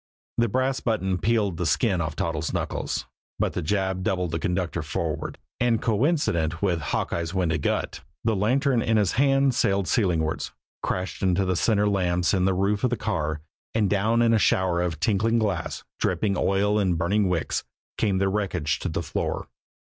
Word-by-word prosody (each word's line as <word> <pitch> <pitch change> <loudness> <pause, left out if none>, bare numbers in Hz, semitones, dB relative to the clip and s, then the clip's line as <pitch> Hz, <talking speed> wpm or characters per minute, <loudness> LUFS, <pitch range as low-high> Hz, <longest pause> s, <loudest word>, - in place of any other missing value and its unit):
The 120 - +4
brass 130 +4 0
button 95 -5 0
peeled 105 -5 +1
the 90 - -1
skin 95 - +2
off 80 -2 -3
Toddles' 80 -1 -2
knuckles, - - -2 0.3
but - - 0
the - - -2
jab 95 +2 0
doubled 90 -2 -1
the 80 - -1
conductor 90 -3 -1
forward, 80 0 -3 0.2
and 120 -3 +2
coincident 105 - +1
with 85 -4 0
Hawkeye's 85 +4 -2
winded 85 -5 +1
grunt, - - -1 0.2
the 115 -1 +2
lantern 125 +5 +2
in 110 0 +2
his 100 -4 +2
hand 135 +1 +3
sailed 100 -5 +1
ceilingwards, 85 -9 0 0.3
crashed 95 0 -3
into 95 0 +2
the 95 0 +1
center 105 +2 +2
lamps 90 -3 +1
in 95 -2 +2
the 95 -1 +2
roof 100 +2 0
of 125 - +3
the 120 - -1
car, 80 -8 -2 0.3
and 105 -3 +2
down 110 +4 +2
in 115 -1 +4
a 110 - +4
shower 90 -3 +2
of 85 -4 -2
tinkling 110 +4 +2
glass, 100 -8 -1 0.2
dripping 100 -2 +1
oil 100 +3 +2
and 95 -4 +1
burning 95 +4 +1
wicks, 85 -3 -1 0.4
came 100 -3 +2
the 95 +1 +2
wreckage 95 -6 -1
to - - -3
the - - -2
floor. - - -3
95 Hz, 180 wpm, -25 LUFS, 85-110 Hz, 0.4 s, The